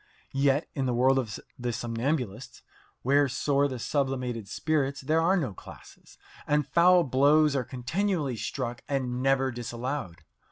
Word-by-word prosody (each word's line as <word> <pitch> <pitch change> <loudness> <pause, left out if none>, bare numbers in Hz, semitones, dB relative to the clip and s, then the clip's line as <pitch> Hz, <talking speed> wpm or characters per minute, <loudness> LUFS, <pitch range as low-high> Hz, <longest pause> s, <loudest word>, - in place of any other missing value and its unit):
Yet 140 +2 +2
in 135 -3 -1
the 125 - 0
world 130 +2 +4
of 110 -6 -4 0.2
the 120 0 -2
somnambulists, 120 +1 -3 0.4
where 140 +2 +4
soar 140 +2 +1
the 130 -2 -5
sublimated 125 -4 -2
spirits, 140 0 -1
there 155 +4 +1
are 185 +4 +3
no 135 - -2
classes, - - -14 0.3
and 150 -1 +2
foul 175 +5 +5
blows 145 +2 +4
are 130 - +1
continually 140 - -2
struck 120 +1 -4
and 130 -3 -1
never 135 0 +2
disallowed. 120 - -5
135 Hz, 145 wpm, -28 LUFS, 125-145 Hz, 0.4 s, foul